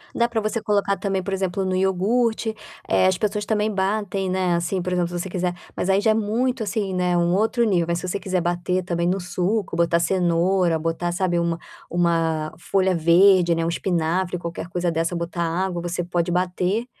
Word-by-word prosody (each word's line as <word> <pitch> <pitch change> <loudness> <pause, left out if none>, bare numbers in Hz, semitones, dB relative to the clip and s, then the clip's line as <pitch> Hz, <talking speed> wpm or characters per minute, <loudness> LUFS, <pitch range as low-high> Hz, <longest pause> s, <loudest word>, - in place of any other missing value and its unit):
Dá 235 - +3
para 230 - -1
você 215 +1 -2
colocar 200 -2 +1
também, 195 -2 -1
por 195 - -3
exemplo, 190 0 -1
no 185 0 0
iogurte, 220 +5 +1 0.3
eh, - - +3
as 185 -1 +2
pessoas 210 0 -1
também 215 0 0
batem, 195 -1 -1
né, 185 -1 +1
assim, 175 +2 -1
por 180 +1 -3
exemplo, 175 -1 +1
se 175 0 -4
você 190 - -4
quiser, 180 0 -1 0.2
mas 185 - -2
aí 195 0 +4
já 220 - +3
é - - +4
muito, 225 +3 0
assim, 205 -2 -2
né, 180 -1 +1
um 175 0 +2
outro 225 +4 +2
nível. 180 -7 +2
Aí 170 - +1
se 180 +2 -4
você 190 +2 -2
quiser 185 -1 -1
bater 175 +2 -1
também 170 -1 -1
no 185 +2 +1
suco, 185 +3 -2
botar 170 0 +2
cenoura, 175 0 +2
botar, 165 +2 -2
sabe, 175 -1 0
uma 170 -1 0 0.3
uma 165 -2 0
folha 190 +1 +1
verde, 175 +1 +5
né, 165 0 -1
o - - 0
espinafre, 175 +1 -1
qualquer 170 -1 -6
coisa 175 0 -1
dessa, 165 +2 -1
botar 170 0 -3
água, 175 +1 -1
você 175 +1 -3
pode 175 0 -1
bater 180 +5 0
180 Hz, 205 wpm, -23 LUFS, 170-195 Hz, 0.3 s, verde